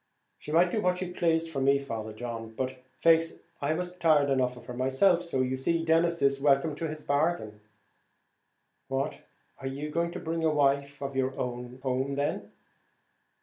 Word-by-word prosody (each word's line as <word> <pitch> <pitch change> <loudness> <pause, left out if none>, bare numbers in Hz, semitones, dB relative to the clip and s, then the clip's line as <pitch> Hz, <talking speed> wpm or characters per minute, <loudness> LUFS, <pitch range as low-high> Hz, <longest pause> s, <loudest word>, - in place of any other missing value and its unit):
"She 150 - -8
might 175 +3 +4
do 215 - 0
what 180 -1 +1
she 180 -1 -4
plased 165 -2 +1
for 135 -3 -2
me, 140 +1 +4
Father 115 -6 -5
John. 115 0 -6
But, 130 0 -4
faix, 165 0 +4 0.3
I 145 +2 +1
was 180 +1 -4
tired 155 -5 +3
enough 125 -2 +1
of 120 - -13
her 125 - -7
myself; 135 +9 +3
so, 170 -7 -1
you 130 0 0
see, 165 +5 0
Denis 170 0 +2
is 140 0 +3
welcome 145 +2 +3
to 165 - -2
his 155 0 -7
bargain." 140 -8 0 1.3
"What! 135 +2 -2 0.4
are 135 - -5
you 145 +3 -4
going 170 +2 0
to - - -5
bring 165 0 -3
a 160 - +4
wife 140 -1 +1
of 140 0 -4
your 130 0 -1
own 125 0 -4
home 130 +1 -1
then?" 140 +1 -2
140 Hz, 185 wpm, -29 LUFS, 130-165 Hz, 1.3 s, might